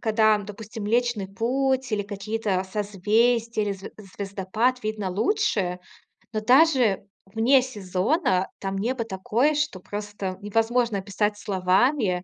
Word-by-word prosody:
когда, 220 -1 +3
допустим, 210 +2 -8
Млечный 235 -2 +1
Путь 260 +5 0
или 205 - +1
какие-то 205 -1 -2
созвездия, 215 +3 +1
или 205 - -1
звез 195 0 -9 0.2
звездопад 205 +6 -1
видно 215 -3 -2
лучше. 205 - 0 0.6
Но 215 - -1
даже 250 - +4 0.2
вне 230 +7 +4
сезона 195 - 0
там 195 0 -3
небо 235 +3 -1
такое, 230 +8 +1
что 295 -10 -1
просто 205 -1 -5
невозможно 225 +2 +1
описать 205 +2 -1
словами. 190 +1 +1
215 Hz, 120 wpm, -25 LUFS, 195-240 Hz, 0.6 s, даже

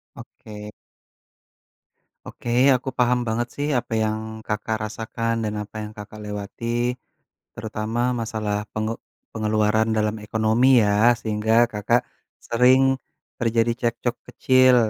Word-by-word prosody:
Oke. 105 -1 -10 1.5
Oke, 120 - -8 0.3
aku 130 +2 -3
paham 125 0 +3
banget 120 +2 0
sih 145 +1 -2
apa 120 -2 -7
yang 110 0 -3
Kakak 110 +1 -1
rasakan 115 +1 -3
dan 105 - -2
apa 105 +1 -10
yang 105 - -9
Kakak 105 +1 -9
lewati, 105 +2 -6 0.9
terutama 110 0 -4 0.2
masalah 105 -2 -2
penge 110 +1 -2 0.3
pengeluaran 110 0 +1
dalam 105 0 0
ekonomi 115 +4 +4
ya 105 +4 +4
sehingga 110 +1 +2
Kakak 115 +3 +1 0.5
sering 130 +3 +4 0.4
terjadi 115 0 +1
cekcok 120 +1 -1 0.2
kecil 130 -1 +5
110 Hz, 115 wpm, -23 LUFS, 105-120 Hz, 1.5 s, kecil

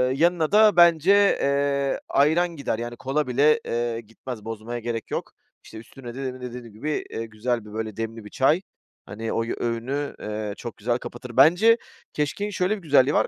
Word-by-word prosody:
yanına 165 +1 +2
da 215 0 +6
bence, 170 +1 +6 0.3
eee, 140 0 +1
ayran 165 +4 +3
gider; 140 -6 -2
yani 120 0 -5
kola 140 +2 -1
bile, 140 +5 +4
eee, 115 0 -2
gitmez, 115 0 -9
bozmaya 115 +2 -5
gerek 115 0 -4
yok. - - -3 0.3
İşte, - - -12
üstüne 120 +2 -10
demin 130 -1 -5
de 125 -1 -5
dediğim 120 -3 -9
gibi, 150 +8 -3
eee, 115 - -4
güzel 115 +1 -2
bir 105 - -11
böyle 110 -1 -4
demli 115 -1 -5
bir 105 - -9
çay, 155 +7 +2 0.4
hani 110 +3 -5
oy 115 0 -1
öğünü, 125 +5 -2
eee, 105 -1 -4
çok 120 -2 -7
güzel 120 +3 0
kapatır. 125 -1 -9
Bence, 215 +8 +6 0.4
keşkeğin 175 +8 -2
şöyle 190 +2 0
bir 195 - -12
güzelliği 145 -3 +4
var. - - +3
125 Hz, 180 wpm, -24 LUFS, 115-150 Hz, 0.4 s, da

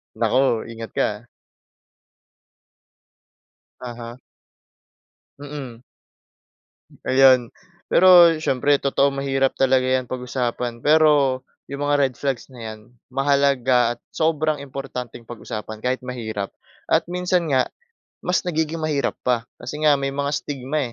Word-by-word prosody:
Naku, 115 +1 +2
ingat 115 0 -8
ka - - +2
ah. 105 +3 -11 2.5
Uh-huh. 120 -1 -8 1.2
Mm. 140 -5 -8 1.3
Ayon. 130 -2 +5 0.4
Pero 175 -3 +7
siyempre 145 -1 +2
totoo, 140 0 +2
mahirap 135 -1 0
talaga 130 -1 +3
'yan 130 0 +1
pag-usapan. 125 -2 -3
Pero 150 -4 +4 0.2
'yong 140 +1 -7
mga 145 0 +2
red 135 -2 +1
flags 135 -4 -2
na 125 - -12
'yan, 110 -1 -7 0.3
mahalaga 130 -3 +2
at - - -41
sobrang 155 -2 0
importanteng 130 -4 -7
pag-usapan 110 -2 -7
kahit 130 +1 -1
mahirap. 110 -5 -5 0.3
At - - +2
minsan 180 -2 0
nga 130 -2 +2 0.6
mas 180 +1 +1
nagiging 160 0 -1
mahirap 150 -3 0
pa, 120 -2 0 0.2
kasi 140 - -6
nga 150 - +6
may 135 - -1
mga 140 +1 -2
stigma 140 -2 -3
135 Hz, 115 wpm, -22 LUFS, 120-145 Hz, 2.5 s, Pero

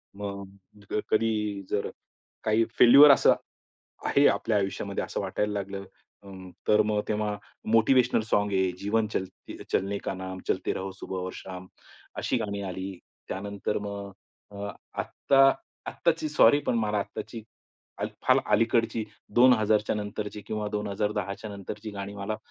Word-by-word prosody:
मग 100 0 -9 0.2
कधी 105 -3 0
जर 100 - -1 0.5
काही 110 +1 +3
फेल्युअर 140 +4 +10
असं 135 - +6 0.7
आहे 140 +1 +4
आपल्या 110 - +1
आयुष्यामध्ये 95 -1 -2
असं - - -4
वाटायला 105 0 -1
लागलं 100 -1 -4 0.4
अ, 100 - -11 0.4
तर 105 - +5
मग 105 0 0
तेव्हा 105 -1 -1 0.4
मोटिवेशनल 115 +2 +4
सॉन्ग 105 0 +2
आहे 95 -1 +2
जीवन 110 +3 +1
चलते 95 -1 -5 0.2
चलने 100 +1 0
का - - -1
नाम, 95 0 -6
चलते - - 0
रहो 95 +1 -4
सुबह 95 0 -6
और 95 0 -4
शाम. 95 -1 -8 0.5
अशी - - 0
गाणी 100 -1 -3
आली. 95 0 -5 0.3
त्यानंतर 100 +1 -3
मग 100 -1 -6 0.9
आत्ता 135 - 0 0.5
आत्ताची, 310 - 0
सॉरी 145 - +6
पण - - +2
मला 105 -2 0
आत्ताची 110 +3 -5 0.8
फार - - +6 0.2
अलीकडची 115 0 +2 0.3
2000 110 -4 +4
नंतरची 105 0 -5
किंवा 105 -1 -3
2010च्या 105 0 -3
नंतरची 105 +2 -7
गाणी 100 0 -6
मला 100 +2 -3
105 Hz, 130 wpm, -27 LUFS, 100-110 Hz, 0.9 s, फेल्युअर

